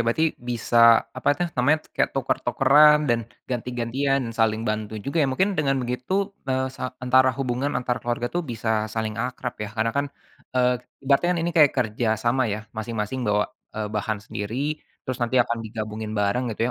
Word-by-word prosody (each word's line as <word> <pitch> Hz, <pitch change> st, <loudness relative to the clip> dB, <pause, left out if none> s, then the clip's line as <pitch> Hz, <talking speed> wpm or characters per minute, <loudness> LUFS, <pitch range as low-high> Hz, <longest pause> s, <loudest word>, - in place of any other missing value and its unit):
berarti 140 Hz, +8 st, +2 dB, 0.2 s
bisa 120 Hz, 0 st, -2 dB, 0.4 s
apa -, -, -1 dB
tuh 175 Hz, -, +1 dB
namanya 140 Hz, +5 st, +3 dB, 0.2 s
kayak -, -, +2 dB
tuker-tukeran 150 Hz, +3 st, +5 dB
dan 120 Hz, -1 st, +3 dB, 0.3 s
ganti-gantian 125 Hz, +3 st, -1 dB
dan 115 Hz, -, -5 dB
saling 110 Hz, 0 st, +2 dB
bantu 110 Hz, 0 st, -2 dB
juga 140 Hz, +4 st, -3 dB
ya -, -, +3 dB
mungkin 190 Hz, +9 st, +2 dB
dengan 135 Hz, -2 st, +2 dB
begitu, 125 Hz, +6 st, -4 dB, 0.4 s
eee, 130 Hz, 0 st, +1 dB
sa -, -, -8 dB, 0.2 s
antara 130 Hz, +1 st, +5 dB
hubungan 130 Hz, +1 st, -1 dB
antar 125 Hz, 0 st, -1 dB
keluarga 120 Hz, 0 st, -2 dB
tuh 175 Hz, -, +2 dB
bisa 115 Hz, -1 st, -4 dB, 0.3 s
saling 110 Hz, -1 st, -1 dB
akrab 125 Hz, 0 st, -4 dB
ya -, -, -6 dB
karena 110 Hz, +1 st, +1 dB
kan, 140 Hz, -, +1 dB, 0.5 s
eee, 125 Hz, 0 st, +4 dB, 0.3 s
ibaratnya 140 Hz, +6 st, +3 dB
ini 170 Hz, -, -1 dB
kayak 150 Hz, -4 st, +7 dB
kerjasama 120 Hz, +1 st, +1 dB
ya 110 Hz, -, -5 dB, 0.2 s
masing-masing 110 Hz, +2 st, -3 dB
bawa, 105 Hz, 0 st, +3 dB, 0.3 s
eee, 110 Hz, -1 st, -2 dB
bahan 105 Hz, 0 st, -1 dB
sendiri, 105 Hz, +3 st, -5 dB, 0.5 s
terus 130 Hz, -1 st, -4 dB
nanti 120 Hz, +2 st, 0 dB
akan 120 Hz, 0 st, -2 dB
digabungin 110 Hz, 0 st, -5 dB
bareng 105 Hz, +5 st, +1 dB
gitu -, -, -11 dB
120 Hz, 170 wpm, -24 LUFS, 110-130 Hz, 0.5 s, kayak